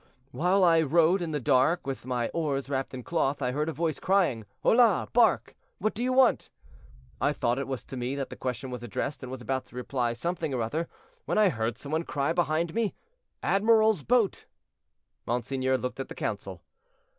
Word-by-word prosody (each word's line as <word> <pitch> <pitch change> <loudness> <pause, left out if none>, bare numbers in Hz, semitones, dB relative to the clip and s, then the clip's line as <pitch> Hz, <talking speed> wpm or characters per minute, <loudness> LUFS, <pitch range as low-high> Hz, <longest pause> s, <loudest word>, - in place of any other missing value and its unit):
"While 185 +6 +2
I 165 -2 +5
rowed 165 +4 +3
in 170 - -2
the 150 -1 -1
dark 135 +6 +2
with 135 -2 -5
my 120 -2 -1
oars 145 -4 -2
wrapped 135 -1 -2
in 125 - -7
cloth, 150 -3 0
I 125 -3 -1
heard 150 +4 -1
a - - -1
voice 160 0 -2
crying, 175 - +1 0.2
'Hola! 230 -4 +4
bark, 225 -6 +3 0.2
what 215 +2 -1
do 220 - -5
you 255 - +1
want?' 255 -1 +3 0.7
I - - +3
thought 120 +3 0
it 140 - -3
was 135 -2 -4
to 130 - -8
me 125 +2 -2
that 140 -1 -4
the - - -6
question 125 0 -4
was 125 -1 -5
addressed, 120 +4 -4
and 130 - -7
was 130 -1 -7
about 130 +3 -2
to - - -17
reply 125 -1 -1
something 160 +2 -3
or 120 - 0
other, 160 +9 -2 0.4
when - - -1
I 210 -2 +5
heard 115 -5 -2
some 140 - -8
one 160 +1 +1
cry 145 -1 -1
behind 165 0 0
me, 225 -2 -1 0.5
'Admiral's 220 -2 +4
boat.'" 230 - +1 0.8
Monseigneur 130 +2 0
looked 125 +1 -5
at 135 - -3
the - - -9
council. 95 -4 -4
140 Hz, 200 wpm, -28 LUFS, 125-175 Hz, 0.8 s, I